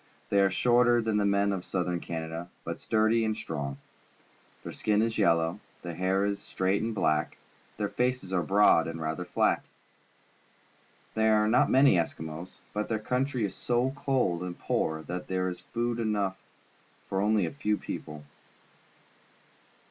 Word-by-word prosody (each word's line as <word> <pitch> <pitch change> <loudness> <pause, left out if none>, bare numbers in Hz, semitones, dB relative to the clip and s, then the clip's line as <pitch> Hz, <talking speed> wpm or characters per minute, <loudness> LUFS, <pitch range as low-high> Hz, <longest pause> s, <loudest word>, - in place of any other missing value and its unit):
They 100 - +3
are 95 - +4
shorter 120 +4 +4
than 110 -2 0
the 100 -1 +2
men 100 0 +2
of 95 -2 -3
Southern 90 -2 -1
Canada, 80 +1 -5
but - - -4
sturdj' 110 +1 +2
and 110 -1 -1
strong. 70 -3 -4 0.9
Their - - -6
skin 105 -1 +1
is 115 0 0
yellow, 85 -1 +2 0.2
their 85 - -5
hair 95 +3 +1
is 100 0 -1
straight 95 +2 0
and 110 0 -2
black, 75 -6 0 0.4
their 105 -1 0
faces 125 -5 -1
are 90 - +2
broad 95 -1 +4
and 80 0 -5
rather 80 +2 -3
flat. - - +1 1.5
There 110 0 +3
are 105 0 +3
not 110 - +4
many 135 -6 +5
Eskimos, 80 +1 -4 0.2
because 105 0 -2
their 110 - +1
country 125 +2 -1
is 95 - -4
so 125 +4 0
cold 130 -12 0
and 90 -1 -5
poor 80 0 -1
that 90 +2 -5
there 95 0 0
is 90 - -6
food 120 0 -2
enough 105 -4 -1 0.7
for 95 0 -1
only 105 -2 +3
a - - -3
few 105 -7 -1
people. 75 0 -7
100 Hz, 160 wpm, -29 LUFS, 85-110 Hz, 1.5 s, many